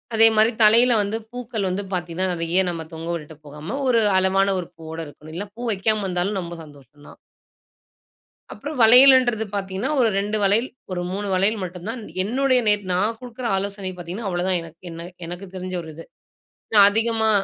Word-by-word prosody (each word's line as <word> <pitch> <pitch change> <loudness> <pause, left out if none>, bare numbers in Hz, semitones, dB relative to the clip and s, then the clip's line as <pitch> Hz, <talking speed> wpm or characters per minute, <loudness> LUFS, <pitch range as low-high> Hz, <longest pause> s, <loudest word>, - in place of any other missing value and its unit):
அதே 225 0 +7
மாதிரி, 220 +2 +5
தலையில 235 +3 +6
வந்து 210 +3 -2
பூக்கள் 235 -5 -4
வந்து 190 +3 -2
பாத்தீங்கனா, 175 +1 -2
நிறைய 170 +2 +1
நம்ம 165 -2 -4
தொங்க 165 +1 -6
விட்டுட்டு 155 -2 -7
போகாம, 150 - -7
ஒரு 230 -3 +3 0.2
அளவான 195 +1 +2
ஒரு 170 - -6
பூவோடு 160 0 -7
இருக்கணும். 155 +2 -13
இல்ல 200 +4 -4
பூ 235 - -10
வெக்காம 210 +1 +1
வந்தாலும் 185 +3 -1
ரொம்ப 170 0 -7
சந்தோஷம் 145 0 -18
தான். - - -15 1.4
அப்புறம் 290 -1 -7
வளையலன்றது 245 -1 +7
பார்த்தீங்கன்னா, 195 +6 -3
ஒரு 235 - +4
2 205 +2 -1
வளையல், 210 +6 +2 0.2
ஒரு 175 -1 -2
3 205 +1 -3
வளையல், 200 +4 +2
மட்டும் 180 0 -8
தான் 235 - -6 0.2
என்னுடைய 255 +3 +2
நேட் 205 -1 +2
நான் 210 +5 0
கொடுக்கிற 250 0 -7
ஆலோசனை 195 -1 -4
பார்த்தீங்கன்னா 180 +6 -6
அவ்ளோதான், 180 +1 0
எனக்கு 165 0 -14
என்ன 170 +1 -8 0.2
எனக்கு 175 +3 -7
தெரிஞ்ச 185 0 -5
ஒரு 160 - -10
இது. 165 +2 -10 0.7
நான் 200 -1 +8
அதிகமா 225 +1 +1
195 Hz, 170 wpm, -22 LUFS, 175-225 Hz, 1.4 s, நான்